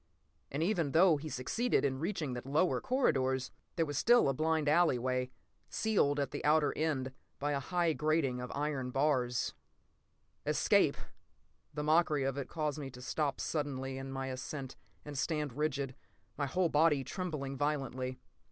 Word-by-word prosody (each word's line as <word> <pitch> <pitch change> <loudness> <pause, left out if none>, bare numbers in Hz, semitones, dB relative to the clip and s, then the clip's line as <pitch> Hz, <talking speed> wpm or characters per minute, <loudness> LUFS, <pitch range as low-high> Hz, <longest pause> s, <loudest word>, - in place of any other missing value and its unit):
And 145 +4 -1
even 170 -7 0
though 170 -1 +6
he 155 +2 -6
succeeded 145 - 0
in 130 -1 0
reaching 155 -5 -2
the 125 - -4
lower 150 +7 +1
corridors, 130 - +1 0.2
there 165 - +2
was 145 -2 -2
still 240 -5 +5
a - - +2
blind 155 +1 +1
alley 155 -3 +4
way, 125 +1 -1 0.4
sealed 145 -10 +1
at 140 - -1
the - - -5
outer 150 0 +3
end 135 -5 -1 0.2
by 145 +1 -1
a 140 - 0
high 170 +2 +1
grating 150 -5 +1
of 125 - -6
iron 140 -3 -1
bars.... 125 -3 +1 0.9
Escape! - - +3 0.8
The 150 - -2
mockery 155 -2 +3
of 135 0 -1
it 140 -2 -4
caused 150 -2 -2
me 140 -2 -5
to 125 - -12
stop 145 +2 -1
suddenly 135 -3 -2
in 135 0 -6
my 135 0 -3
ascent 130 +1 -5 0.3
and 150 - -7
stand 150 -1 -1
rigid, 140 -2 -1 0.4
my 140 - -1
whole 180 +4 +1
body 150 -2 +3
trembling 140 -2 -4
violently. 130 -3 -2
145 Hz, 160 wpm, -33 LUFS, 130-155 Hz, 0.9 s, though